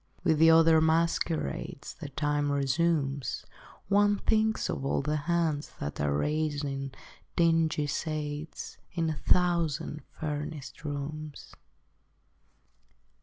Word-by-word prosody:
With 160 -2 +3
the 165 0 +7
other 160 0 +6
masquerades 160 - 0
That 140 -2 -8
time 145 0 +1
resumes, 140 -1 0 0.4
One 205 +1 +4
thinks 220 +1 +1
of - - -3
all 140 - 0
the 150 +2 0
hands 160 -4 0
That 70 0 -4
are 75 0 +1
raising 145 - -1 0.4
dingy 165 -3 +3
shades 150 +1 -4
In 165 -2 0
a 155 - -4
thousand 170 -4 +1 0.2
furnished 150 -1 -5
rooms. 150 0 -6
155 Hz, 105 wpm, -29 LUFS, 145-165 Hz, 0.4 s, the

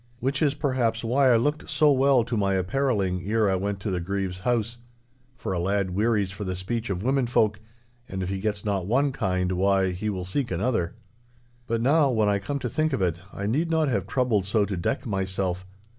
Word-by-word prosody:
Which 135 +4 -1
is, 145 -2 +2
perhaps, 130 -6 0
why 130 +3 +3
I - - +6
looked 145 +7 0
so 150 -2 +4
well 135 -2 +4
to 120 +1 -3
my 100 -2 +1
apparelling 95 -2 0
ere 110 0 +2
I 95 - +2
went 100 +1 -2
to 105 - -2
the 90 - -1
Grieve's 95 0 -3
house. 120 +2 -1 0.6
For 110 - -4
a 90 - -1
lad 95 +1 0
wearies 105 0 +1
for 95 +2 -6
the 95 -1 -3
speech 115 +5 -3
of 95 0 -2
women 130 0 +1
folk, 105 -4 +2 0.5
and 95 0 -3
if 90 - -3
he 95 0 -2
gets 105 0 -2
not 100 -3 -1
one 135 +6 +2
kind—why, 95 -1 +1
he 100 +4 -3
will 95 -3 -3
seek 120 +7 -2
another. 90 -1 -1 0.7
But 115 0 0
now, 145 +3 +4
when 110 -4 +2
I 100 -1 +2
come 140 +9 -3
to 130 - -3
think 155 +4 0
of 130 - -1
it, 85 -2 0
I 100 - -5
need 150 +11 0
not 160 -3 +2
have 100 -6 -1
troubled 120 -7 +1
so 105 +1 +2
to 100 - -3
deck 90 +12 -2
myself. 95 -3 -2
105 Hz, 215 wpm, -26 LUFS, 95-125 Hz, 0.7 s, I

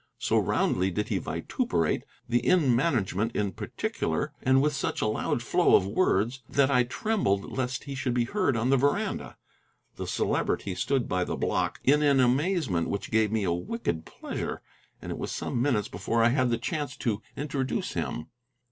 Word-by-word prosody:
So - - +2
roundly 95 +1 +1
did 105 +3 -2
he - - 0
vituperate 80 -3 -1 0.2
the 120 0 +2
inn 140 -1 +3
management 115 - 0
in 100 -2 0
particular, - - -3
and 130 0 +4
with 150 +2 +2
such 140 - -2
a - - 0
loud 110 - -1
flow - - +4
of - - +4
words, 115 - +1
that 140 0 +3
I 125 -2 +4
trembled 120 - -1
lest 130 -1 -2
he 140 - -6
should 135 -2 -2
be 120 - +3
heard 140 - 0
on 120 +4 +1
the 135 - +5
veranda. 140 +2 0 0.6
The - - -4
Celebrity 100 - 0
stood 125 +6 0
by 90 0 0
the - - -3
block, - - -1
in 145 +3 +4
an 140 -2 +4
amazement 130 - +2
which 100 - -3
gave 110 -1 +3
me 110 -2 0
a 85 -3 +1
wicked 85 - -3
pleasure, - - -5 0.4
and - - -5
it - - -5
was - - -3
some 120 - -2
minutes 120 -7 +1
before 115 0 0
I 115 - +6
had 130 0 +2
the 115 - +1
chance 145 +2 -3
to 110 -5 -1 0.2
introduce 135 -2 -2
him. 80 - -3
125 Hz, 185 wpm, -28 LUFS, 105-140 Hz, 0.6 s, I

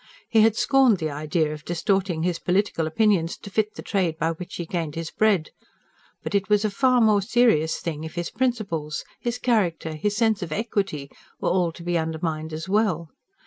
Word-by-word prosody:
He 225 - +5
had 220 0 +4
scorned 260 -3 +4
the 155 -3 -3
idea 155 +1 -1
of 150 -1 -9
distorting 175 -1 0
his 175 -1 0
political 180 -3 0
opinions 175 -1 +2
to 200 - -11
fit 215 +1 0
the - - -8
trade 180 -6 0
by 165 0 0
which 175 +2 -7
he 175 - -4
gained 165 -3 -3
his 165 -1 -4
bread. 200 -8 +2 0.7
But - - -4
it 200 0 +1
was 210 0 +3
a 215 - 0
far 255 +4 +3
more 215 -2 +4
serious 195 -8 +3
thing 155 -2 -4
if 160 +1 -7
his 175 -1 -3
principles, 200 -12 -2
his 240 0 -2
character, 180 -10 0
his 205 +7 -1
sense 220 -3 +2
of 170 -4 -5
equity 195 -8 -2 0.3
were - - 0
all 180 -2 +2
to 170 - -11
be 175 0 0
undermined 160 0 -3
as 160 +2 -5
well. 190 -6 +1
180 Hz, 195 wpm, -24 LUFS, 160-210 Hz, 0.7 s, He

